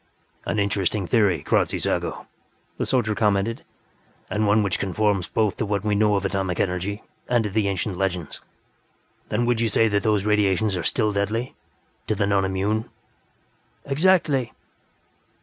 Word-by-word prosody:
"An -, -, -1 dB
interesting 100 Hz, -1 st, 0 dB
theory, 100 Hz, -3 st, +2 dB
Kradzy -, -, +1 dB
Zago," -, -, -2 dB, 0.5 s
the -, -, -1 dB
soldier 120 Hz, -5 st, +1 dB
commented. 105 Hz, +1 st, 0 dB, 0.7 s
"And 105 Hz, 0 st, +1 dB
one 105 Hz, +1 st, +4 dB
which 100 Hz, -, -1 dB
conforms 100 Hz, -1 st, 0 dB
both 110 Hz, -3 st, 0 dB
to 110 Hz, -, -1 dB
what 100 Hz, -1 st, -1 dB
we 105 Hz, -, +1 dB
know 105 Hz, 0 st, +3 dB
of 100 Hz, -1 st, -1 dB
atomic 95 Hz, -2 st, -1 dB
energy 95 Hz, +3 st, -2 dB, 0.3 s
and 120 Hz, -2 st, +3 dB
to 105 Hz, -, -3 dB
the 105 Hz, 0 st, +1 dB
ancient 95 Hz, -1 st, -2 dB
legends. 90 Hz, -5 st, -2 dB, 0.9 s
Then -, -, 0 dB
you -, -, +1 dB
would 120 Hz, -1 st, +1 dB
say 115 Hz, +2 st, +3 dB
that 100 Hz, -1 st, +1 dB
those 105 Hz, -3 st, +1 dB
radiations 105 Hz, -1 st, +2 dB
are 90 Hz, -, -2 dB
still 110 Hz, +4 st, +1 dB
deadly 105 Hz, +5 st, -2 dB, 0.5 s
to 110 Hz, -, 0 dB
the 100 Hz, -, +1 dB
non 100 Hz, -1 st, +2 dB
immune?" 100 Hz, +4 st, -1 dB, 1.0 s
"Exactly. 140 Hz, -4 st, +2 dB
105 Hz, 155 wpm, -23 LUFS, 95-110 Hz, 1.0 s, one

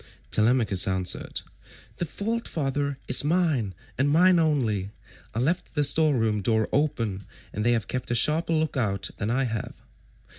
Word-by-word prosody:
Telemachus 110 Hz, -4 st, +3 dB
answered, 95 Hz, -1 st, -3 dB, 0.6 s
"The 175 Hz, -, -2 dB
fault, 230 Hz, +6 st, -3 dB
father, 140 Hz, -2 st, -2 dB
is 130 Hz, -, +5 dB
mine, 150 Hz, -, +1 dB, 0.2 s
and 140 Hz, +2 st, +3 dB
mine 175 Hz, +4 st, +5 dB
only; 120 Hz, -, 0 dB, 0.5 s
I -, -, 0 dB
left 165 Hz, +7 st, -1 dB
the 150 Hz, -, +2 dB
store 155 Hz, 0 st, +3 dB
room 110 Hz, -2 st, 0 dB
door 110 Hz, +1 st, +1 dB
open, 115 Hz, -9 st, -1 dB, 0.3 s
and 105 Hz, -, -2 dB
they 120 Hz, +1 st, +3 dB
have 115 Hz, -3 st, -1 dB
kept 125 Hz, -1 st, -4 dB
a 120 Hz, -, +1 dB
sharper 155 Hz, +8 st, +2 dB
look 155 Hz, -1 st, 0 dB
out 100 Hz, -6 st, -1 dB
than 105 Hz, -, -2 dB
I 130 Hz, +3 st, +1 dB
have. 115 Hz, -4 st, -5 dB
130 Hz, 160 wpm, -26 LUFS, 110-155 Hz, 0.6 s, is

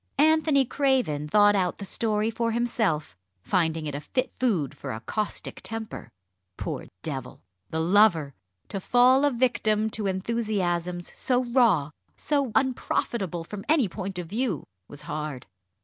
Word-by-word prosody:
Anthony 310 Hz, -2 st, +4 dB
Craven 250 Hz, -, +1 dB
thought 205 Hz, +4 st, +5 dB
out 180 Hz, -3 st, 0 dB
the 200 Hz, -, -6 dB
story 215 Hz, +1 st, 0 dB
for 230 Hz, 0 st, -1 dB
himself, 220 Hz, -, 0 dB, 0.3 s
finding 160 Hz, -3 st, 0 dB
it 145 Hz, -, -3 dB
a 140 Hz, -, -3 dB
fit 255 Hz, -, -2 dB
food 190 Hz, -, 0 dB
for -, -, -6 dB
a 110 Hz, -, -4 dB
caustic 210 Hz, -, -4 dB
temper. 225 Hz, -1 st, -6 dB, 0.5 s
Poor -, -, -4 dB, 0.2 s
devil 135 Hz, -5 st, -5 dB, 0.3 s
the 160 Hz, -, -2 dB
lover! 170 Hz, -4 st, +4 dB, 0.4 s
To 195 Hz, -, -3 dB
fall 250 Hz, +7 st, +5 dB
a -, -, +5 dB
victim 220 Hz, -3 st, +1 dB
to 210 Hz, -2 st, -2 dB
enthusiasms 185 Hz, -4 st, -1 dB
so 255 Hz, -1 st, 0 dB
raw, 230 Hz, -, +3 dB, 0.3 s
so 280 Hz, -5 st, 0 dB
unprofitable 215 Hz, -, 0 dB
from 200 Hz, +4 st, -7 dB
any 300 Hz, -8 st, +4 dB
point 190 Hz, +1 st, -5 dB
of 180 Hz, -, -3 dB
view, 205 Hz, -, -2 dB, 0.2 s
was 145 Hz, -, -10 dB
hard. 150 Hz, -3 st, -5 dB
210 Hz, 145 wpm, -26 LUFS, 165-245 Hz, 0.5 s, thought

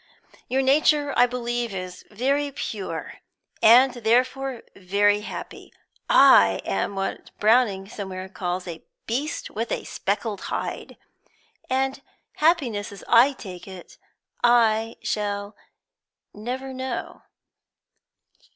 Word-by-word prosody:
"Your 265 Hz, +1 st, +1 dB
nature, 290 Hz, +1 st, +3 dB
I 245 Hz, +1 st, +5 dB
believe, 240 Hz, -3 st, -3 dB
is 185 Hz, -1 st, -7 dB
very 275 Hz, +6 st, 0 dB
pure, 210 Hz, -6 st, -6 dB, 0.4 s
and 245 Hz, +3 st, +7 dB
therefore 250 Hz, +2 st, 0 dB
very 205 Hz, +2 st, +2 dB
happy. 210 Hz, -, -8 dB, 0.4 s
I 100 Hz, -, +6 dB
am 95 Hz, -, -2 dB
what 195 Hz, 0 st, -4 dB
Browning 210 Hz, -3 st, +3 dB
somewhere 190 Hz, -2 st, -6 dB
calls 180 Hz, -1 st, -4 dB
a 165 Hz, -2 st, -7 dB, 0.2 s
'beast 270 Hz, +7 st, -3 dB
with 225 Hz, +2 st, -4 dB
a -, -, -2 dB
speckled 205 Hz, 0 st, -3 dB
hide,' -, -, -5 dB, 0.7 s
and 265 Hz, +1 st, 0 dB, 0.4 s
happiness, 275 Hz, -12 st, +1 dB, 0.2 s
I 245 Hz, +4 st, +6 dB
take 185 Hz, -8 st, -10 dB
it, 185 Hz, -2 st, -12 dB, 0.4 s
I 225 Hz, -2 st, +3 dB
shall 205 Hz, 0 st, -3 dB, 0.8 s
never 255 Hz, +5 st, -5 dB
know." 260 Hz, -2 st, -5 dB
230 Hz, 105 wpm, -24 LUFS, 200-260 Hz, 0.8 s, and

